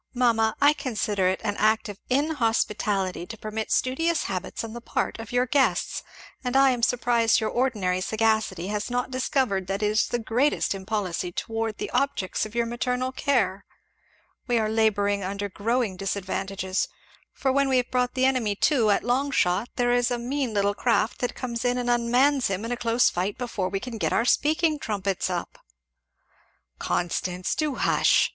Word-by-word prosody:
Mamma, 225 -3 +2
I 290 +1 +6
consider 215 -9 -1
it 185 +1 0
an 205 -2 -1
act 220 +1 +2
of 205 -1 -8
inhospitality 225 - 0
to 225 - -8
permit 215 +1 -5
studious 325 +6 +1
habits 190 +2 -4
on 225 -1 -6
the 240 - -7
part 230 - -2
of 225 - -8
your 245 +1 +2
guests. 265 +2 +1 0.4
And 250 0 -2
I 270 0 +6
am 245 -2 -2
surprised 235 -1 +3
your 220 - -1
ordinary 210 -8 0
sagacity 220 -4 0
has 210 +2 -2
not 245 +1 -2
discovered 255 -7 0
that 195 +2 -2
it - - +3
is 210 +1 +2
the 240 - -1
greatest 240 +4 +1
impolicy 190 -3 -3
towards 225 +3 -3
the - - -5
objects 215 -8 0
of 215 - -15
your 235 0 +2
maternal 250 +2 -2
care. 225 -9 0 0.8
We 240 -2 +2
are 215 -1 +1
labouring 205 -2 +1
under 200 +2 -3
growing 220 0 -1
disadvantages; 195 0 -2 0.4
for 265 - -1
when 275 +1 +2
we 260 - +3
have 250 -1 -1
brought 250 0 0
the 260 0 +2
enemy 250 -6 +1
to 235 -1 +2
at 205 - +2
long 260 +4 +1
shot 200 -3 +1
there 245 0 +1
is 245 0 +2
a 245 - -1
mean 250 -1 -2
little 200 0 +2
craft 230 +1 +1
that 245 - -2
comes 235 -2 -4
in 245 0 +1
and 245 -1 0
unmans 245 +3 +3
him 195 +3 -3
in 230 - -4
a - - +1
close 235 0 +2
fight 190 +7 -2
before 230 -7 -2
we 195 +1 -2
can 235 0 -7
get - - 0
our 230 - +2
speaking 310 +3 +2
trumpets 200 - -2
up." 175 -2 -4 1.2
"Constance! 180 +1 -1
Do 305 -3 -1
hush!" - - +3
230 Hz, 180 wpm, -25 LUFS, 200-250 Hz, 1.2 s, I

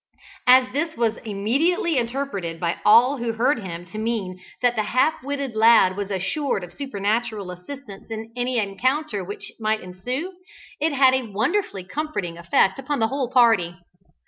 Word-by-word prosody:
As 255 0 +6
this 315 +1 -2
was 230 -2 +1
immediately 290 - 0
interpreted 230 -9 -3
by 170 -1 -1
all 250 +6 +6
who 235 -1 -2
heard 245 +4 +1
him 175 -4 -7
to 215 +4 -8
mean 215 -5 -2 0.2
that 245 -1 +3
the 220 - +1
half 255 +8 +1
witted 280 -3 -4
lad 220 -4 +6
was 200 0 -4
assured 200 - -1
of 175 0 -10
supernatural 220 -5 -2
assistance 200 +4 -10
in 225 0 -6
any 250 0 -1
encounter 235 +3 0
which 200 +3 -7
might 215 0 0
ensue, 250 - -5 0.5
it 315 +2 +1
had 265 -2 +5
a 260 -4 -1
wonderfully 220 - -1
comforting 205 - -4
effect 170 +5 +2
upon 280 +2 -2
the 225 -1 +1
whole 270 -3 -2
party. 225 -9 +4
230 Hz, 160 wpm, -23 LUFS, 195-270 Hz, 0.5 s, As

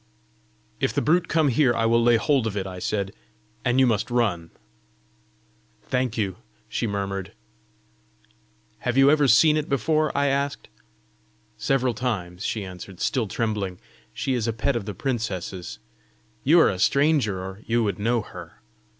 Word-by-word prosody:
"If - - 0
the - - +2
brute 175 +2 +2
come 155 -2 +2
here, 125 -1 +3
I 115 - +1
will 115 +1 +3
lay 120 0 +5
hold 120 +1 +1
of 105 -2 -4
it," 95 - -2
I 95 -1 -7
said, 100 +1 -2 0.5
"and 125 +2 +2
you 130 - +6
must 115 -3 0
run." 105 -9 0 1.4
"Thank 125 -3 0
you!" 100 -4 -1 0.3
she 115 - -2
murmured. 100 -2 -3 1.5
"Have 125 +1 -2
you 135 +1 +7
ever 150 -2 +4
seen 150 +6 +5
it 155 - -3
before?" 155 +4 +1
I 140 - +2
asked. 140 0 -1 0.9
"Several 130 -2 0
times," 100 -7 -3
she 105 -2 -2
answered, 90 0 -10
still 125 -7 0
trembling. 100 -3 -2 0.3
"She 135 - -2
is 120 -3 -1
a 115 - 0
pet 115 +4 0
of 115 -4 -2
the 105 - -5
princess's. 95 - -4 0.7
You 165 +6 +6
are - - +5
a 95 - -5
stranger, 140 -5 +2
or 95 +2 -7
you 115 0 +2
would 100 -3 -2
know 115 +1 +1
her!" - - -11
115 Hz, 160 wpm, -24 LUFS, 100-135 Hz, 1.5 s, you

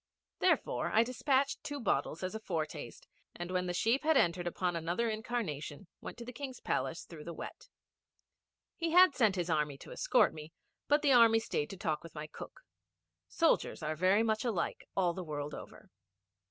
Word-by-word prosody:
Therefore, - - +1
I 220 - +5
despatched 270 +3 0
two 290 -1 -4
bottles 165 - -1
as 185 - -3
a 220 - -4
foretaste, 165 -7 -5 0.3
and 175 +1 -5
when 180 0 0
the 175 - -1
sheep 230 +8 +2
had 315 -1 +4
entered 175 -2 +2
upon 175 0 -1
another 175 +8 -1
incarnation 200 -8 -4 0.2
went - - -8
to 235 - -8
the 250 - -8
King's 265 0 -6
Palace - - -2
through - - -10
the - - -7
wet. - - -9 1.1
He 330 -1 -2
had 360 -3 +8
sent 220 -7 +3
his 175 -2 -1
army 150 -3 0
to - - -12
escort - - +3
me, 155 +1 -10 0.3
but 295 +1 +3
the 280 -2 +5
army 230 -2 +7
stayed 185 -9 -2
to 195 - -8
talk 155 -4 -1
with 165 -2 -12
my 150 0 -5
cook. 155 - -10 0.7
Soldiers 90 - +1
are 155 +1 -1
very 185 +6 +3
much 220 -1 0
alike 220 -9 -2
all 180 -3 +2
the 185 - -5
world 150 -2 -5
over. - - -11
185 Hz, 185 wpm, -33 LUFS, 160-240 Hz, 1.1 s, had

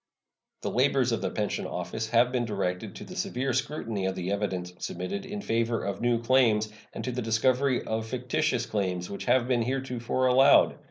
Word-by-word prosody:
The - - -1
labors - - +2
of - - 0
the - - -1
Pension - - -2
Office 110 0 -4
have 120 +2 +4
been 125 -2 0
directed 95 -5 -3
to - - -8
the - - -10
severe 130 +1 -1
scrutiny 115 -7 -2
of 95 - -2
the 90 +1 -3
evidence 95 -3 -2
submitted 200 0 -4
in 205 +1 -5
favor 115 - 0
of 100 +1 -3
new 120 -1 +2
claims 115 -4 +3 0.2
and - - -6
to 130 - -2
the 125 +1 -3
discovery 125 +4 +2
of 110 0 -2
fictitious 125 +2 0
claims 90 -4 -2
which 100 - -5
have 125 -2 +3
been 125 -2 +2
heretofore 130 0 -1
allowed. 130 +2 +5
120 Hz, 185 wpm, -28 LUFS, 105-130 Hz, 0.2 s, allowed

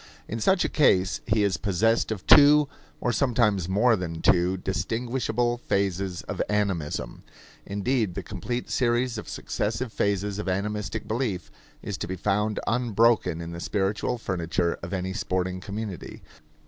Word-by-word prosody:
In 115 - -4
such 185 - +3
a - - +2
case 95 - +3
he 105 -1 +2
is 95 -3 +1
possessed 110 +4 +1
of 100 -4 -4
two, 145 0 +7 0.3
or 120 - 0
sometimes 110 -7 +1
more 115 +5 +4
than 85 -4 -4
two, 90 +1 +3
distinguishable 120 +4 -1
phases 95 -4 -1
of - - -4
animism. 100 -8 -1 0.5
Indeed, 100 0 0
the - - -4
complete 125 0 -4
series 120 -1 +1
of - - -9
successive 110 +2 -3
phases 100 0 0
of 105 - -3
animistic 105 +2 -2
belief 105 - -2 0.3
is - - -4
to - - -3
be 95 - -3
found 105 +3 0
unbroken 115 -7 +2
in 85 0 -6
the 85 - -6
spiritual 105 +6 -1
furniture 85 -4 -1
of 85 - -7
any 95 -1 -2
sporting 95 -3 -2
community. 100 -2 -6
105 Hz, 150 wpm, -26 LUFS, 95-115 Hz, 0.5 s, two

